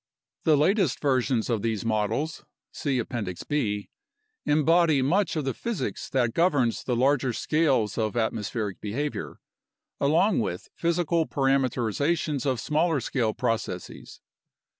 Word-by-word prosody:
The 155 -2 +5
latest 180 - +2
versions 130 -4 +1
of 115 -4 0
these 110 -1 -2
models 110 +8 -1 0.3
(see 140 -3 -1
Appendix 110 -7 -4
B) 105 -9 -2 0.6
embody 155 -1 +4
much 175 +6 +1
of 155 -3 -1
the 135 - -1
physics 235 - -4
that 120 -4 +1
governs 145 -9 +2
the 125 - -1
larger 130 0 +2
scales 135 -8 +1
of 110 +1 -1
atmospheric 110 -2 -2
behavior, 140 +8 -4 0.6
along 165 +8 +3
with 90 -6 -3
physical 170 -1 0
parameterization 135 +3 +1
s 135 - -3
of 130 -3 0
smaller 155 +2 +1
scale 115 -2 -1
processes. 115 -7 -4
135 Hz, 125 wpm, -26 LUFS, 115-155 Hz, 0.6 s, The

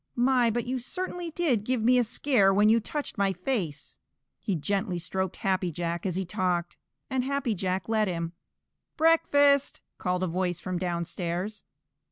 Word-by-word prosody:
My, 245 -1 +3
but 235 +1 -1
you 255 +1 -2
certainly 355 +5 -4
did 295 -10 0
give 250 0 0
me 250 +2 +5
a - - +4
scare 230 -3 +3
when 205 +2 +4
you 230 +1 +5
touched 285 +2 -5
my 195 -1 +2
face!" 180 - -3 0.4
He 200 - -1
gently 195 +3 -1
stroked 185 +1 -2
Happy 185 -2 0
Jack 170 +3 -3
as 180 - -2
he 190 0 -1
talked, 175 -1 -1 0.3
and 260 -2 -1
Happy 275 -3 -1
Jack 185 -1 -2
let 220 -1 +2
him. 170 -2 -3 0.6
"Breakfast!" 285 -3 +4 0.2
called 180 0 -1
a - - +1
voice 175 0 -1
from 180 0 -3
downstairs. 175 +3 -3
200 Hz, 165 wpm, -28 LUFS, 180-250 Hz, 0.6 s, me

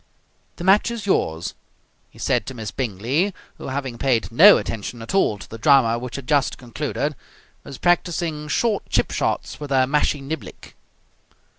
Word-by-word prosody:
"The 175 - -8
match 195 +5 +4
is 235 -4 -5
yours," 80 - 0 0.6
he - - -21
said - - 0
to 130 - -6
Miss 110 -3 -5
Bingley, 130 - -1 0.2
who, - - -7
having 130 -3 -4
paid 120 -4 +1
no 190 - +8
attention 115 +2 -5
at 115 - -7
all 190 - +2
to 100 - -11
the 115 - -9
drama 120 -3 +4
which 125 0 -7
had 140 -3 -7
just 145 -3 +1
concluded, 140 +3 -3 0.5
was 135 - -9
practising 170 -3 0
short 210 +7 0
chip - - +1
shots - - -2
with 145 -1 -6
her 130 -2 +3
mashie 150 +2 +1
niblick. 155 +4 -7
140 Hz, 165 wpm, -22 LUFS, 120-160 Hz, 0.6 s, no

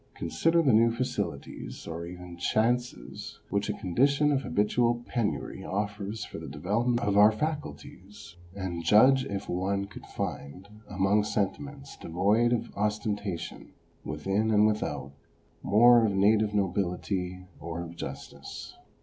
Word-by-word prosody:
Consider 165 0 +1
the 135 - +4
few 115 +1 +5
facilities, 110 - -4
or 85 +1 -5
even 90 0 -9
chances, 115 - -1
which 100 +1 0
a - - +1
condition 140 - +2
of 135 -2 +1
habitual 120 +2 +1
penury 115 -4 -2
offers 105 +1 -3
for - - -8
the - - -8
development 120 +5 0
of 100 0 +2
our 105 +1 +8
faculties, 105 - -6 0.2
and 90 -4 -4
judge 130 +9 +6
if 100 -1 -4
one 100 +2 -1
could 100 - -12
find, 80 +8 -5 0.2
among 95 +3 +2
sentiments 135 +7 -3
devoid 105 +8 +2
of 120 - -2
ostentation 105 -3 -3 0.3
within 105 +3 -1
and 105 -1 +5
without, 105 -10 -1 0.5
more 120 +3 +6
of 105 -3 +2
native 105 +1 +3
nobility 90 -1 -1
or 85 +2 -5
of 85 0 -9
justice. - - -8
105 Hz, 130 wpm, -28 LUFS, 95-120 Hz, 0.5 s, our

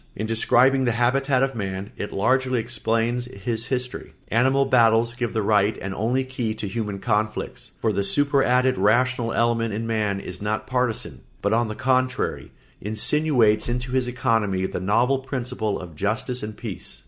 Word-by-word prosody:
In 110 - -3
describing 125 +4 +3
the 120 - +2
habitat 130 +3 +2
of 135 0 0
man 95 -3 -4
it 105 - -5
largely 130 +4 +1
explains 115 +1 -1
his 115 +1 -4
history. 125 -1 -3 0.2
Animal 130 +4 +3
battles 115 -2 +4
give 120 -1 -3
the 110 -2 -1
right 105 0 +2
and 95 0 -5
only 120 +6 0
key 125 -4 -3
to 105 - -4
human 105 0 -3
conflicts, 105 0 -2
for 110 - 0
the 100 +1 0
superadded 130 +2 +2
rational 120 +3 +2
element 115 -2 +1
in 115 +2 -3
man 105 -3 -1
is 90 -1 -8
not 105 +1 -2
partisan, 125 -3 -2 0.2
but 100 +2 +2
on 115 0 +2
the 110 - -5
contrary 130 +1 0 0.3
insinuates 110 0 +2
into 125 +1 -3
his 130 -1 +1
economy 115 -6 0
the - - -3
novel 120 +8 +2
principle 125 -5 -3
of 85 -4 -10
justice 110 - -2
and 105 0 -6
peace. - - -7
115 Hz, 165 wpm, -23 LUFS, 105-125 Hz, 0.3 s, battles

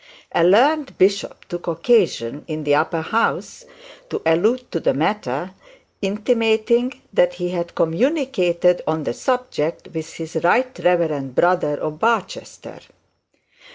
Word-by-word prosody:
A - - +2
learned 270 - +3
bishop 200 +2 +1
took 175 0 -7
occasion, 165 - +1
in 155 -1 -4
the 145 -1 +2
Upper 160 +3 +1
House, 225 +7 -1 0.4
to - - -3
allude 215 +10 +1
to 165 - -1
the - - +1
matter, 165 0 -2 0.5
intimating 225 +4 +1
that 180 -1 +3
he 180 0 -3
had 170 -1 -4
communicated 180 - +1
on 160 0 -1
the 130 - -2
subject 250 - -2
with 160 0 -5
his 165 0 -6
right 245 +11 +1
reverend 155 -7 0
brother 175 -5 +2
of 155 +1 -5
Barchester. 225 -2 -2
180 Hz, 125 wpm, -20 LUFS, 160-230 Hz, 0.5 s, learned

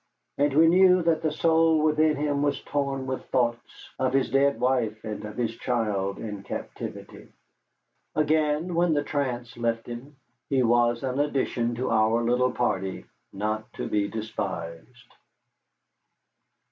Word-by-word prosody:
And 145 0 +3
we 160 +2 +7
knew 180 +1 +5
that 165 -1 +2
the 155 - 0
soul 160 0 +3
within 155 0 +3
him 145 -1 0
was 145 -1 0
torn 140 -2 -2
with 130 0 -4
thoughts 120 -2 -2
of 130 -1 +1
his 135 -1 +1
dead 140 -2 +3
wife 120 -4 0
and 105 -1 -5
of 105 - -8
his 115 -2 -1
child 105 -6 -1
in 105 -3 -6
captivity. - - -8 0.8
Again, 155 +2 +1
when 170 -1 +2
the 145 - +1
trance 125 -5 -3
left 115 -1 -1
him, 120 +5 -8 0.3
he 135 -2 +2
was 120 +1 +2
an 130 +1 -2
addition 130 -5 0
to 125 +1 -2
our 110 +1 +3
little 125 +2 +2
party 95 -6 -2 0.3
not 110 +3 -3
to - - -4
be 105 -1 0
despised. 105 0 -6
125 Hz, 145 wpm, -26 LUFS, 115-145 Hz, 0.8 s, we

